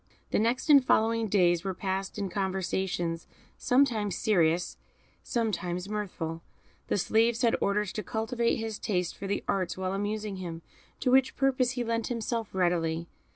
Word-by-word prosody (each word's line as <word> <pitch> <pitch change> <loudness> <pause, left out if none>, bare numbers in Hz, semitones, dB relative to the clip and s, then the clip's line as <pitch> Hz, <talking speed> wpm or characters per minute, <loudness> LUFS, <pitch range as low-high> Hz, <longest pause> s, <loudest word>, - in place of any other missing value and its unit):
The - - +2
next 235 +4 +1
and 285 -3 +7
following 225 -2 +2
days 175 -4 +3
were 190 -2 -3
passed 190 +2 -3
in 200 -1 -1
conversations, 185 -3 -2 0.3
sometimes 240 -7 +2
serious, 175 -4 +1 0.4
sometimes 185 -6 -2
mirthful; 180 -6 -4 0.5
the - - +1
slaves 225 +5 +2
had 230 - +4
orders 200 0 0
to 215 - -3
cultivate 230 +3 0
his 225 -2 -4
taste 180 -4 -1
for 200 - -6
the 200 - -1
arts 185 -3 -1
while 185 0 -2
amusing 205 0 -2
him, 170 -3 -6 0.4
to 250 - +2
which 265 0 +4
purpose 260 -2 +2
he 245 -1 -2
lent 230 -1 -1
himself 230 -2 -2
readily. 170 -2 0
205 Hz, 155 wpm, -29 LUFS, 180-230 Hz, 0.5 s, and